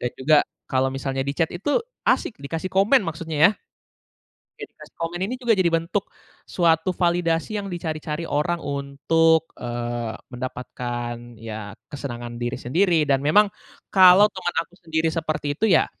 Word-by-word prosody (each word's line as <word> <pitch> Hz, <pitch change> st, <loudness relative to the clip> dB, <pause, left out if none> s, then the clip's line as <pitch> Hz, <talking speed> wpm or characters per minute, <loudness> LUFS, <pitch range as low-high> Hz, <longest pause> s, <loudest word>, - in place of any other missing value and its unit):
Dan 125 Hz, -, -1 dB
juga, 150 Hz, +3 st, +5 dB, 0.3 s
kalau 130 Hz, -1 st, +2 dB
misalnya 135 Hz, 0 st, -2 dB
di 140 Hz, -, -1 dB
chat 165 Hz, -, +2 dB
itu 205 Hz, -, 0 dB, 0.3 s
asik, 215 Hz, -, +1 dB
dikasih 165 Hz, +6 st, -4 dB
komen 200 Hz, +6 st, +4 dB
maksudnya, 165 Hz, -2 st, -4 dB
ya. -, -, -3 dB, 1.1 s
Dikasih -, -, -12 dB
komen 165 Hz, +1 st, -3 dB
ini 225 Hz, -, -4 dB
juga 240 Hz, -3 st, +2 dB
jadi 185 Hz, -, +2 dB
bentuk, 170 Hz, +5 st, 0 dB, 0.4 s
suatu 165 Hz, 0 st, +2 dB
validasi 175 Hz, +2 st, 0 dB
yang 200 Hz, -, -5 dB
dicari-cari 155 Hz, -1 st, -4 dB
orang 165 Hz, +4 st, 0 dB
untuk, 150 Hz, +4 st, +1 dB
eee, 120 Hz, -1 st, -4 dB, 0.2 s
mendapatkan 120 Hz, -1 st, -5 dB
ya, 110 Hz, -2 st, -7 dB, 0.2 s
kesenangan 120 Hz, -4 st, -6 dB
diri 120 Hz, 0 st, -2 dB
sendiri. 170 Hz, +7 st, +2 dB
Dan 135 Hz, -2 st, +2 dB
memang, 205 Hz, +8 st, +5 dB, 0.4 s
kalau 190 Hz, +2 st, +8 dB
teman 185 Hz, -2 st, -3 dB
aku 175 Hz, -, -13 dB
sendiri 160 Hz, -1 st, 0 dB
seperti 155 Hz, -3 st, -2 dB
itu, 220 Hz, -, +1 dB
ya, 175 Hz, -, +5 dB
160 Hz, 145 wpm, -23 LUFS, 130-175 Hz, 1.1 s, kalau